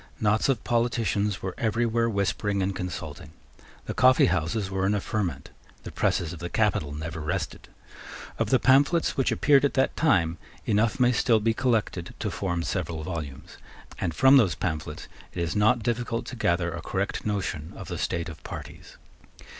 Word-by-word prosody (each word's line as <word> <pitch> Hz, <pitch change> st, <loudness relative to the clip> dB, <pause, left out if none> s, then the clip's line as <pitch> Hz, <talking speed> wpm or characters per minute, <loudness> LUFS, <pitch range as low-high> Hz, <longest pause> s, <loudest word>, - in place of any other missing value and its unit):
Knots 110 Hz, +4 st, +2 dB
of 125 Hz, -5 st, +1 dB
politicians 110 Hz, -4 st, 0 dB
were 95 Hz, -1 st, -3 dB
everywhere 115 Hz, +1 st, +1 dB
whispering 100 Hz, -1 st, 0 dB
and 95 Hz, 0 st, -1 dB
consulting. 85 Hz, -3 st, -6 dB, 0.5 s
The -, -, -4 dB
coffeehouses 95 Hz, -6 st, +3 dB
were 95 Hz, 0 st, 0 dB
in 105 Hz, -, +2 dB
a -, -, +1 dB
ferment. 90 Hz, -10 st, -3 dB, 0.3 s
The -, -, -7 dB
presses 85 Hz, -1 st, 0 dB
of 85 Hz, -, -9 dB
the 85 Hz, -, -5 dB
capital 95 Hz, -9 st, +1 dB
never 80 Hz, +3 st, -5 dB
rested. 75 Hz, 0 st, -4 dB, 0.7 s
Of -, -, 0 dB
the -, -, +5 dB
pamphlets 145 Hz, +6 st, +3 dB
which 135 Hz, -, +1 dB
appeared 140 Hz, -2 st, +4 dB
at 140 Hz, -, +1 dB
that 130 Hz, -, +2 dB
time, 90 Hz, -, +2 dB, 0.3 s
enough 110 Hz, +6 st, +1 dB
may 125 Hz, -1 st, +5 dB
still 115 Hz, -1 st, +3 dB
be 115 Hz, +1 st, +1 dB
collected 110 Hz, -8 st, -1 dB
to -, -, -3 dB
form 85 Hz, -3 st, -2 dB
several 85 Hz, -3 st, -3 dB
volumes; 75 Hz, -5 st, -6 dB, 0.4 s
and 85 Hz, -4 st, -2 dB
from 135 Hz, +1 st, +7 dB
those 105 Hz, -9 st, +3 dB
pamphlets 75 Hz, -3 st, -4 dB, 0.3 s
it -, -, -3 dB
is 85 Hz, -, -3 dB
not 110 Hz, +2 st, +3 dB
difficult 120 Hz, -1 st, -1 dB
to -, -, -7 dB
gather 85 Hz, -6 st, +1 dB
a -, -, -5 dB
correct -, -, -2 dB
notion 95 Hz, -7 st, -3 dB
of -, -, -8 dB
the -, -, -5 dB
state 85 Hz, +1 st, -2 dB
of 80 Hz, -3 st, -10 dB
parties. -, -, -9 dB
100 Hz, 170 wpm, -26 LUFS, 85-115 Hz, 0.7 s, from